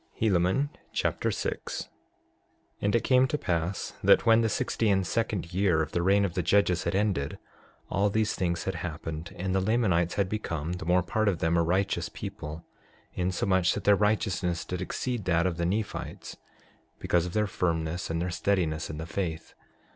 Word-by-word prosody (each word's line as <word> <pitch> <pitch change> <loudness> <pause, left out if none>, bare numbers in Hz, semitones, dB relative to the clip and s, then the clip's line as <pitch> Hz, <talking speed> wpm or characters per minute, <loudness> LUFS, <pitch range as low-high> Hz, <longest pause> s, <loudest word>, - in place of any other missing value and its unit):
Helaman 105 +7 +2 0.2
Chapter - - 0
6 - - -3
6:1 - - -19 0.9
And 100 +2 +1
it 115 - +2
came 130 0 +4
to 150 - -1
pass 90 - -2
that - - +5
when 115 0 +6
the 115 - +1
sixty 110 +1 0
and 95 -2 +2
second 100 -3 -2
year 90 -4 +3
of 75 - -6
the 85 - 0
reign 100 +3 +4
of 90 - -3
the 90 - 0
judges 90 0 +2
had 85 - 0
ended, 95 -9 0 0.5
all 100 +2 +1
these 110 +1 +1
things 85 -2 -1
had 95 - -2
happened 80 -1 -5
and 95 +1 -2
the 95 - +2
Lamanites 95 -5 +2
had 100 -2 +1
become, 85 -6 -3
the 90 -3 -6
more 90 +1 +3
part 110 +4 0
of 95 -4 +2
them, 80 +1 +1
a 85 - +4
righteous 90 0 0
people, 85 -6 -7 0.5
insomuch 90 0 +1
that 105 - -4
their 100 0 +6
righteousness 100 -5 0
did 90 0 -4
exceed 120 +3 -3
that 85 -1 +2
of 90 -3 0
the 85 0 0
Nephites 105 +3 -4 0.6
because 85 0 +1
of 90 - -7
their 105 0 +2
firmness 85 -3 -1
and 80 0 -1
their 90 +1 -2
steadiness 85 -3 0
in 75 - -5
the 80 - -5
faith. 85 -2 -4
90 Hz, 185 wpm, -28 LUFS, 85-100 Hz, 0.9 s, when